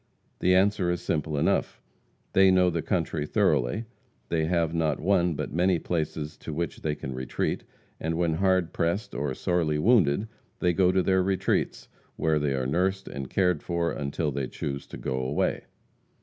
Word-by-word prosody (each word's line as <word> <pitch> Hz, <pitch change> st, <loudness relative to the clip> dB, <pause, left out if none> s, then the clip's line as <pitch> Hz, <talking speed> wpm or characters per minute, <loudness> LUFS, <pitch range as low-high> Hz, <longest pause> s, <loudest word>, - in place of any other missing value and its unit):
The 90 Hz, 0 st, +4 dB
answer 95 Hz, -1 st, +3 dB
is 90 Hz, 0 st, 0 dB
simple 75 Hz, -3 st, -2 dB
enough. -, -, +1 dB, 0.5 s
They 95 Hz, 0 st, +6 dB
know 90 Hz, -1 st, +4 dB
the 85 Hz, -1 st, -1 dB
country 80 Hz, -5 st, -1 dB
thoroughly; 65 Hz, -, +1 dB, 0.4 s
they 80 Hz, -2 st, +1 dB
have, 85 Hz, -1 st, +1 dB
not 80 Hz, -3 st, 0 dB
one, 90 Hz, -2 st, +2 dB
but -, -, -4 dB
many 90 Hz, +2 st, +3 dB
places 80 Hz, -2 st, -3 dB
to -, -, -7 dB
which 85 Hz, 0 st, -3 dB
they 75 Hz, -1 st, -1 dB
can 65 Hz, -2 st, -6 dB
retreat, 65 Hz, 0 st, -2 dB, 0.4 s
and 80 Hz, +1 st, -2 dB
when 85 Hz, -2 st, +1 dB
hard 95 Hz, 0 st, +1 dB
pressed 85 Hz, +7 st, -1 dB
or 70 Hz, -2 st, -2 dB
sorely 80 Hz, -3 st, 0 dB
wounded, 100 Hz, -, +3 dB, 0.3 s
they 90 Hz, -1 st, +1 dB
go 90 Hz, +1 st, +4 dB
to 95 Hz, 0 st, +2 dB
their 95 Hz, 0 st, +3 dB
retreats, 95 Hz, 0 st, 0 dB, 0.3 s
where 80 Hz, -1 st, +1 dB
they 70 Hz, -2 st, 0 dB
are 65 Hz, -1 st, -1 dB
nursed 95 Hz, +7 st, 0 dB
and 70 Hz, -2 st, -6 dB
cared 90 Hz, -5 st, +1 dB
for 85 Hz, -1 st, -1 dB
until 75 Hz, +2 st, -2 dB
they 70 Hz, -1 st, -2 dB
choose 70 Hz, +1 st, -5 dB
to -, -, -8 dB
go 65 Hz, -, -3 dB
away. 65 Hz, +3 st, -1 dB
85 Hz, 175 wpm, -27 LUFS, 75-90 Hz, 0.5 s, They